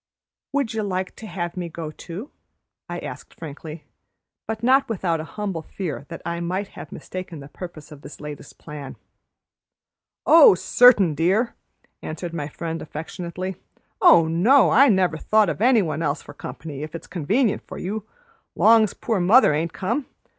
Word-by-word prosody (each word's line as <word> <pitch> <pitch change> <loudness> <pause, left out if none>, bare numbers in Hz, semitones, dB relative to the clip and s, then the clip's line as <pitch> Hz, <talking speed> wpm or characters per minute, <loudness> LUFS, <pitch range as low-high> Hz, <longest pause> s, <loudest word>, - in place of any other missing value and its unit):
"Would 275 -5 -1
you 220 - -1
like 185 -2 -3
to 220 - -9
have 175 -2 -4
me 175 -2 -4
go 160 -1 -6
too?" 180 - -9 0.6
I - - -4
asked - - -8
frankly, 155 0 -9 0.6
but 220 0 -4
not 265 +2 +4
without 175 -6 -1
a - - -4
humble 195 -6 -3
fear 160 -4 -6
that 165 - -8
I 170 0 -3
might 185 +4 -3
have - - -11
mistaken 185 -3 -7
the 140 - -10
purpose 160 -1 -10
of 145 -2 -12
this 145 - -11
latest 150 -1 -9
plan. 145 -2 -9 1.3
"Oh 320 - +8
certain, 205 -4 +5
dear!" 190 - +1 0.5
answered 170 +2 -6
my 150 -4 -3
friend 165 +2 -5
affectionately. 175 +4 -6 0.4
"Oh 330 - +7
no, 215 +12 +4
I 275 +3 +6
never 185 -5 +2
thought 215 +3 +3
o' - - -5
any 235 -1 +4
one 155 -2 -3
else 150 -1 -1
for - - -11
comp'ny, 145 -4 -8
if 155 +2 -6
it's 165 - -7
convenient 205 - 0
for - - -8
you, 210 +3 -4 0.5
long's 220 -2 +5
poor 225 -4 -1
mother 185 - +5
ain't 160 +3 -1
come. 235 +9 -2
180 Hz, 165 wpm, -23 LUFS, 160-220 Hz, 1.3 s, Oh